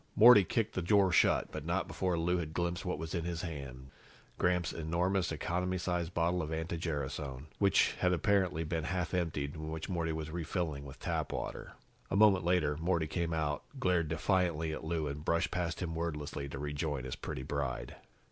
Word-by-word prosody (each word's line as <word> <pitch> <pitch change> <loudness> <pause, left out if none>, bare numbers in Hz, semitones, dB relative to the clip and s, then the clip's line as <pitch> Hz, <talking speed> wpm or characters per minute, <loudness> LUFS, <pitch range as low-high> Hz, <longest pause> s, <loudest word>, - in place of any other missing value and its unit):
Morty 110 -1 +9
kicked 110 +4 -1
the 95 - -1
door 95 +1 +4
shut, 85 - +3
but - - -5
not - - -1
before 90 -2 -1
Lou 90 +2 +1
had 80 -2 -5
glimpsed 85 0 -1
what 90 -4 -2
was 80 +1 -5
in 85 -3 -1
his 85 -1 -3
hand 70 -5 -7 0.5
Gramps' 90 -2 +1
enormous 85 +3 0
economy 90 +3 -1
size 90 -2 -1
bottle 85 +1 +1
of 80 -1 -4
anti 80 +1 -2
gerasone, 70 -4 -3
which 100 -1 +4
had 90 - +3
apparently 90 -2 +2
been 80 -1 -2
half 90 -2 -2
emptied, 75 -5 -1
and 80 0 -6
which 80 +3 -5
Morty 85 -3 -1
was 80 -1 -4
refilling 80 -3 -2
with 70 - -10
tap - - -2
water. - - -5 0.4
A - - -1
moment 100 -3 +6
later, 85 -4 +2
Morty 85 0 +1
came 85 +1 -2
out, 80 -2 0 0.2
glared 90 -5 +2
defiantly 80 -1 +1
at - - -6
Lou 80 -1 -1
and 75 +1 -4
brushed 85 +1 +1
past 85 -1 -2
him 80 -2 -3
wordlessly 75 -4 -3
to 70 - -6
rejoin 75 -1 -2
his 65 - -4
pretty 65 - -5
bride. 65 -3 -3
85 Hz, 190 wpm, -33 LUFS, 75-90 Hz, 0.5 s, Morty